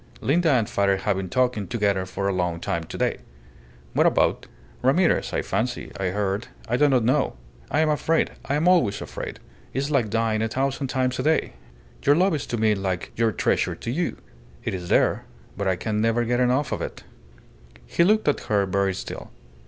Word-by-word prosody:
Linda 165 +4 +2
and 120 -7 +3
father 100 -1 +2
have 100 +1 0
been 95 -1 -4
talking 125 -6 +1
together 100 -5 0
for 100 +1 -2
a 100 - +1
long 90 -2 -1
time 85 0 -2
today." - - -2 0.7
"What - - +4
about?" - - +1 0.3
"Ramirez, 150 +8 +2
I - - -1
fancy 120 +2 -2
I 95 - -2
heard. 100 +3 -1 0.2
I 120 - +1
do 145 +3 +4
not 130 -4 +3
know. 130 +4 +1 0.3
I 155 - +2
am 155 - +2
afraid. 160 +2 +1
I 140 - 0
am 155 +4 +1
always 165 - +4
afraid. - - -6 0.3
It - - -5
is 140 +2 -1
like 125 -7 +2
dying 110 0 +1
a 110 - +1
thousand 135 +3 -1
times 130 0 -1
a - - +2
day. 160 +1 +1 0.5
Your 145 - +4
love 185 +3 +3
is 150 - -2
to 120 - -2
me 110 -1 +3
like 95 -3 -3
your 115 -1 +2
treasure - - 0
to 115 - -5
you. 170 +7 -1 0.5
It - - -2
is 90 -2 -5
there, - - +2 0.3
but 100 0 -2
I 95 - +2
can 105 +4 -2
never 115 +1 +2
get 120 +1 +1
enough 125 +3 +2
of - - -2
it." - - -6 0.8
He 170 - +2
looked 215 +2 +3
at 145 - +3
her 100 -2 +3
very 95 0 0
still. - - -7
115 Hz, 200 wpm, -24 LUFS, 100-140 Hz, 0.8 s, What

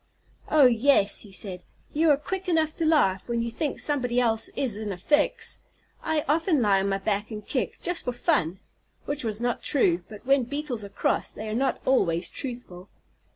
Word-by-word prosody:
"Oh, 300 -3 +6
yes," 240 -3 +4
he 205 - -8
said, 190 -2 -3 0.3
"you 320 +2 +3
are 290 - +5
quick 375 +5 -4
enough 320 -2 +2
to 325 - +1
laugh 195 -12 +2
when 235 -1 -1
you 235 - -3
think 290 +4 -3
somebody 250 -4 0
else 225 -2 +2
is 255 -7 -1
in 210 -1 -4
a 185 - -5
fix. 295 +11 +1 0.4
I 310 -2 -1
often 320 +1 +2
lie 205 -4 +3
on 195 +1 0
my 195 - +1
back 205 +1 -2
and 210 -2 -7
kick, - - -2
just 355 -1 -1
for 250 - 0
fun." 240 - 0 0.5
(Which 290 0 -3
was 215 -2 -2
not 240 0 -1
true, 180 - +2
but 215 +2 -11
when 270 -1 +3
Beetles 265 -4 -4
are 200 - -8
cross - - -1
they 220 - -7
are - - -3
not 265 +4 0
always 170 -10 +2
truthful.) 240 -8 -7
240 Hz, 200 wpm, -26 LUFS, 205-295 Hz, 0.5 s, Oh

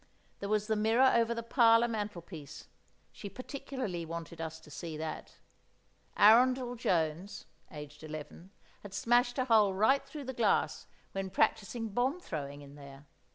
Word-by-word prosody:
There 200 - -5
was 215 0 +1
the 220 0 0
mirror 225 +5 +4
over 235 0 +2
the 230 - -4
parlour 230 -1 +5
mantelpiece, 180 - -6 0.5
she 200 - -8
particularly 255 -7 -5
wanted 165 0 -7
us 160 0 -5
to 150 - -16
see 160 0 -6
that. 155 0 -6 0.8
Arundel 245 +3 +5
Jones 180 -2 -1 0.2
(aged 150 -1 -10
eleven) 155 +3 -8 0.3
had 200 -1 -9
smashed 240 +4 +2
a 255 - +1
hole 215 -5 +4
right 240 +8 +3
through 300 -2 -8
the 260 0 -5
glass 225 -4 +1 0.2
when 195 0 -3
practising 220 +4 0
bomb 250 - 0
throwing 145 - -6
in 140 0 -13
there. 140 -1 -13
205 Hz, 150 wpm, -32 LUFS, 160-240 Hz, 0.8 s, parlour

